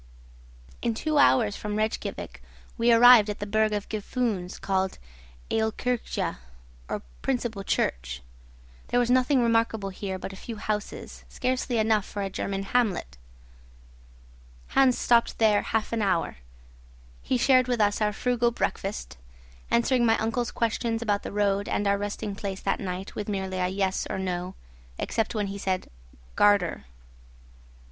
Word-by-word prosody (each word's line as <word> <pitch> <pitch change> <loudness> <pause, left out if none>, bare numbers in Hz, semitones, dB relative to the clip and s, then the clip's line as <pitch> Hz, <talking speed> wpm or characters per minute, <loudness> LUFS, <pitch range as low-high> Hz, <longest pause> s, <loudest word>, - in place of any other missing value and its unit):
In 230 -1 0
two 305 +5 0
hours 225 -7 +4
from 210 -1 -4
Rejkiavik 215 +1 -3 0.3
we 235 0 +3
arrived 235 -2 +8
at 210 - -3
the 205 - -4
burgh 215 +1 +2
of 205 -1 -2
Gufunes, 215 -4 -2
called 190 -1 -1 0.5
Aolkirkja, 225 +2 -1 0.5
or - - -3 0.2
principal 235 -6 -2
church. 60 - -1 0.6
There 245 - +2
was 245 0 +2
nothing 255 0 +3
remarkable 225 -3 +1
here 190 0 -4
but 195 - -7
a - - -8
few 225 +4 -7
houses, 210 0 -4
scarcely 255 -1 -1
enough 220 -2 +2
for 205 - -4
a 195 - -3
German 195 +1 -3
hamlet. 205 - 0 1.5
Hans 265 -2 +4
stopped 235 -1 +3
here 215 -2 +4
half 225 +1 -2
an 230 - 0
hour. 185 - 0 0.8
He 255 - 0
shared 255 0 +4
with 245 -2 0
us 205 0 +2
our 210 0 +2
frugal 240 +2 +1
breakfast; 205 - -3 0.5
answering 240 +1 +3
my 225 -1 +4
uncle's 230 +2 -1
questions 230 0 -1
about 205 -2 +1
the - - -6
road 200 -1 0
and 205 - 0
our 200 0 +2
resting 205 0 -4
place 195 -1 -5
that 195 - 0
night 185 0 -5
with 210 0 -5
merely 190 -2 -2
yes 190 0 -1
or - - -2
no, 185 0 -3 0.4
except 225 +1 -1
when 210 -1 0
he 200 0 -5
said 190 -2 -2 0.4
"Gardär." 200 - +3
210 Hz, 145 wpm, -27 LUFS, 195-235 Hz, 1.5 s, arrived